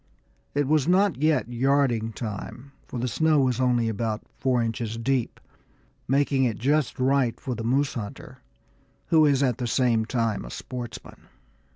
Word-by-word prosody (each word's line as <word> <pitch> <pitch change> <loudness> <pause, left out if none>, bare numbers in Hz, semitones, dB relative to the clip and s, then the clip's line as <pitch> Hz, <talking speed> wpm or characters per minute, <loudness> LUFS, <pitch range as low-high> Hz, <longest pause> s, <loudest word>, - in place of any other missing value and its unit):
It 145 -1 +1
was 155 -1 +2
not 185 -3 +3
yet 155 -6 +2
yarding 120 -2 +1
time, 115 +4 -7 0.2
for - - -6
the 125 +1 -1
snow 155 +3 +2
was 130 -3 +1
still 130 0 +2
only 120 -2 +2
about 110 0 -2
four 130 -2 +1
inches 115 -1 -2
deep, 125 +1 -1 0.7
making 135 0 +2
it 120 -4 0
just 145 +3 0
right 130 -2 +1
for 130 - -4
the 115 -1 -5
moose 135 +4 +1
hunter 130 +3 -7 0.7
who 160 -2 +5
is 140 -1 +3
at 125 -4 0
the 125 - -2
same 115 -2 +2
time 115 -3 -1
a - - -8
sportsman. 120 - -8
125 Hz, 165 wpm, -25 LUFS, 115-140 Hz, 0.7 s, who